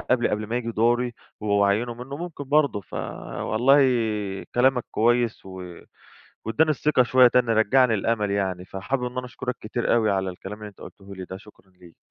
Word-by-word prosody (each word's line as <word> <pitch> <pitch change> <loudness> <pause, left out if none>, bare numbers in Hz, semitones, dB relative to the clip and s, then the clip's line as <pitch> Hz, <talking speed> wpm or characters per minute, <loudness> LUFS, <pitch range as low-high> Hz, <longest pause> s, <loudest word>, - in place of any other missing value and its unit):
قبلي 125 -1 +1
قبل 105 0 -2
ما 115 - -2
ييجي 115 -1 -3
دوري 120 +2 +1 0.3
و 105 - -6
وعينوا 100 +4 +2
منه، 125 +4 -8
ممكن 165 -3 -7
برضو 140 -6 +2
فوالله 120 +6 0 0.8
كلامك 125 0 +3
كويس 120 -2 +1
و 90 -2 -9 0.7
واداني 155 +8 +2
الثقة 150 -2 +2
شوية 125 +1 +6
تاني، 120 -1 +2
رجّع 110 +4 +4
لي 115 - +2
الأمل 105 0 0
يعني، 95 -3 -1
فحابب 125 +8 -3
إن 125 0 -6
أنا 125 - -4
أشكرك 125 0 -5
كتير 120 +3 -1
أوي 110 -3 +2
على 95 -1 0
الكلام 95 +3 -9
اللي 105 - -8
أنت 100 - -18
قلته 100 0 -11
لي 95 -1 -7
ده، 95 - -8
شكرًا 95 -1 -18
ليك. 90 -2 -18
115 Hz, 185 wpm, -24 LUFS, 100-125 Hz, 0.8 s, شوية